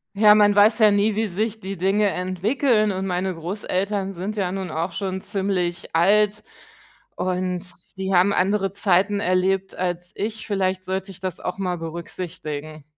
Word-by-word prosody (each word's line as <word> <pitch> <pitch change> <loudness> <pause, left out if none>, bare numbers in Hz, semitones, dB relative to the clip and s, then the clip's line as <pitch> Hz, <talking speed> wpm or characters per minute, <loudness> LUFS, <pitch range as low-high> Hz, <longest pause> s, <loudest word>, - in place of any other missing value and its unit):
Ja, 210 +1 +7
man 205 -1 +5
weiß 205 +2 +5
ja 215 -3 +6
nie, 205 +1 +2
wie 220 +1 +1
sich 215 +3 -2
die 195 -1 -5
Dinge 195 +3 +2
entwickeln 215 +5 +1
und 190 0 -3
meine 185 +1 -1
Großeltern 195 +3 -2
sind 195 +4 -4
ja 190 -3 -1
nun 190 -2 -4
auch 165 +3 -2
schon 190 +1 -3
ziemlich 190 -5 -2
alt 210 +4 +3 0.7
und 180 -1 -2 0.3
die 190 0 -2
haben 185 +2 +5
andere 195 0 +1
Zeiten 200 +1 +2
erlebt 190 +1 +1
als 175 -1 -3
ich. 215 +1 -4
Vielleicht 185 -3 -1
sollte 190 +1 -3
ich 190 - -10
das 185 -2 -4
auch 180 - -4
mal 180 -2 -2
berücksichtigen. 160 -2 -6
190 Hz, 160 wpm, -23 LUFS, 180-205 Hz, 0.7 s, Ja